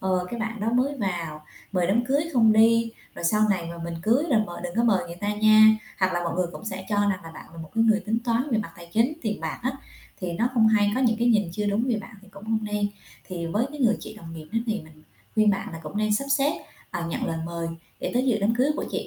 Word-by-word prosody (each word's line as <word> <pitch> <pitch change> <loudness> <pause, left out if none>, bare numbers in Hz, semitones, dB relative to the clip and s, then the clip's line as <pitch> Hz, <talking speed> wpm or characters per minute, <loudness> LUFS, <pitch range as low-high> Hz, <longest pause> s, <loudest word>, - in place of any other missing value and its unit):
"Ờ, 185 -1 0
cái, 235 -1 -4
bạn 225 0 -3
đó 220 +2 0
mới 265 +4 +1
vào, 170 -6 -3 0.3
mời 180 -3 +1
đám 220 +6 +2
cưới 275 +4 +2
không 225 -4 +5
đi 230 +1 +5 0.2
rồi - - -7
sau 210 +4 +3
này 185 -4 0
mà 170 - -8
mình 170 - -4
cưới 240 - +3
rồi 225 -4 +5
mời 175 - -8
đừng 175 - -4
có 235 - +3
mời 195 -6 +3
người 170 - -8
ta 205 - -1
nha", 215 0 +7 0.2
hoặc 185 -1 +2
là 175 0 -1
mọi 170 -1 -2
người 180 -1 +1
cũng - - -9
sẽ 190 -3 -5
cho 210 - 0
rằng 200 -2 +1
là 165 - -8
bạn - - -10
là - - -11
một 160 - -11
cái 225 0 +3
người 220 -1 +4
tính 220 +3 -1
toán 240 +4 0
về 225 - +2
mặt 200 -6 -4
tài 170 0 -12
chính, 235 +7 +3
tiền 210 -5 -2
bạc 160 -1 -4
á 260 - +1 0.5
thì 180 -2 -3
nó 230 +8 +1
không 220 -3 +5
hay, 205 -2 +3
có 255 - 0
những 235 -4 +3
cái 240 +1 +2
nhìn 210 -6 +3
chưa 210 +3 -2
đúng 205 +4 +1
về 240 - +2
bạn - - -12
thì 200 - -17
cũng 200 +1 -12
không 220 0 +1
nên. 210 -1 0 0.4
Thì 170 -3 -4
với 210 +9 0
cái 295 - -9
người 225 -4 +4
chị - - -8
đồng 165 -6 -10
nghiệp 155 -1 -9
đó 225 - +2
thì 215 -2 -1
mình 155 -1 -16 0.3
khuyên 215 -1 +5
bạn 195 -3 -3
là 165 - -6
cũng 155 +6 -7
nên 215 0 +1
sắp 245 - 0
xếp, 285 +2 0 0.3
ờ, 175 -2 -3
nhận 165 - -2
lời 165 - -2
mời 170 -1 -4 0.3
để - - -2
tới 250 +2 +2
dự 230 -4 +3
đám 215 +3 +2
cưới 260 +5 +2
của - - -2
chị - - -3
210 Hz, 290 wpm, -25 LUFS, 180-230 Hz, 0.5 s, nha